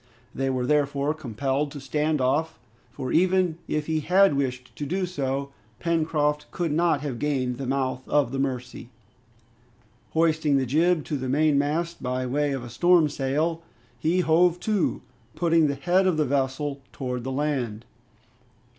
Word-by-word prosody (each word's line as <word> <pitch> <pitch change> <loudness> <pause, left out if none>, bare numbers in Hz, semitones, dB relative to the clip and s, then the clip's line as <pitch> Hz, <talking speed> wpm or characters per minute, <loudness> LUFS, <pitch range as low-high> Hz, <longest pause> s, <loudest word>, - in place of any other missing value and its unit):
They 135 0 -1
were 130 -1 -1
therefore 145 +1 +1
compelled 140 0 -2
to 145 - -7
stand 150 +3 0
off, 150 +5 0 0.3
for 130 - -5
even 180 -1 +2
if 150 -1 -1
he 160 0 0
had 185 +3 +4
wished 125 -2 -3
to 145 - -3
do 185 +5 -1
so, 140 -5 -3 0.3
Pencroft 155 -3 0
could 170 -4 -2
not 165 -2 +2
have 135 -5 -4
gained 130 -4 -1
the 135 - -4
mouth 130 -1 -2
of 145 -5 +2
the 135 - -3
Mercy. 125 -2 -4 1.2
Hoisting 160 -3 +2
the 135 - +1
jib 160 +5 +2
to 150 - -2
the 130 -1 -4
mainmast 155 +4 +1
by 130 0 -2
way 145 +3 0
of 135 -3 -3
a 120 - -8
storm 175 +3 +4
sail, 150 +5 -1 0.4
he 170 +7 +2
hove 175 +1 +3
to, 215 -3 0 0.3
putting 165 -2 +3
the 140 - -1
head 180 +6 +2
of 180 -4 +1
the 155 - +2
vessel 140 +1 -1
towards 125 -2 -4
the 130 - -3
land. 130 -6 -2
145 Hz, 160 wpm, -25 LUFS, 135-160 Hz, 1.2 s, had